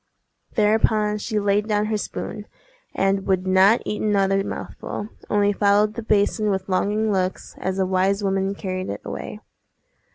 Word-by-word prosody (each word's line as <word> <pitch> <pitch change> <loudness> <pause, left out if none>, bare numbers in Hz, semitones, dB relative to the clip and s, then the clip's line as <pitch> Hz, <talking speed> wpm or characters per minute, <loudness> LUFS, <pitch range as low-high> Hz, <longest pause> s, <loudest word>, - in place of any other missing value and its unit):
Thereupon 210 -1 +2
she 215 0 -1
laid 205 +1 +1
down 210 -1 +1
her 215 0 0
spoon, 210 +1 -6 0.5
and 195 0 +1
would 190 -1 +1
not 190 +4 +4
eat 210 - -3
another 195 -2 +2
mouthful—only 205 0 -3
followed 205 +1 +3
the 235 - -5
basin 215 0 +1
with 190 -1 -1
longing 210 +3 +1
looks, 185 -1 -2
as 190 0 -2
the 190 - +2
wise 190 +2 +1
woman 195 0 0
carried 185 -2 -4
it 100 - -5
away. 70 0 -6
200 Hz, 150 wpm, -23 LUFS, 190-210 Hz, 0.5 s, not